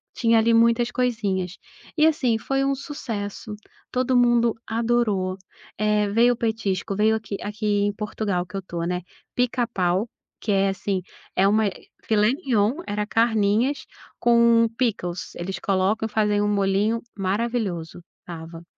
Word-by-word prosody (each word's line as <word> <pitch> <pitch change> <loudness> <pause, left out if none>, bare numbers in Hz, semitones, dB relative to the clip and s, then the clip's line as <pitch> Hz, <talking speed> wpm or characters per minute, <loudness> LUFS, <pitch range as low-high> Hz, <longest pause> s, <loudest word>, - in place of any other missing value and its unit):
Tinha 230 -1 +3
ali 230 +1 +3
muitas 235 +1 +3
coisinhas. 205 -7 -1 0.4
E, 305 - +5
assim, 255 -8 +2
foi 270 +4 -1
um 275 0 +1
sucesso, 220 -7 -6 0.4
todo 255 0 +1
mundo 240 -1 +4
adorou, 225 -5 0 0.4
eh, 210 -1 +1
veio 235 +4 +4
o - - -8
petisco, 215 -4 -1
veio 215 +2 +3
aqui 215 -2 -4
aqui 210 +1 -5 0.2
em 205 - 0
Portugal 205 -3 -2
que 190 +2 -7
eu - - -3
tô, 175 -2 -6
né, 180 +1 -2 0.3
pica-pau, 230 -5 0 0.3
que 210 - -1
é 195 0 +3
assim, 195 -1 -2 0.3
é 195 +1 +4
uma 215 +1 +3
eh, 195 - -7 0.2
filé-mignon, 230 - +1
era 210 0 -1
carninhas, 225 +4 +1 0.3
com 235 -1 +5
pickles, 190 -8 -2
eles 190 +2 -5
colocam 200 +3 +1
e - - -13
fazem 210 -1 +2
um 205 - +1
molhinho 200 +3 +1 0.2
maravilhoso, 195 -4 -2 0.2
estava. 165 0 -9
215 Hz, 145 wpm, -24 LUFS, 195-235 Hz, 0.4 s, E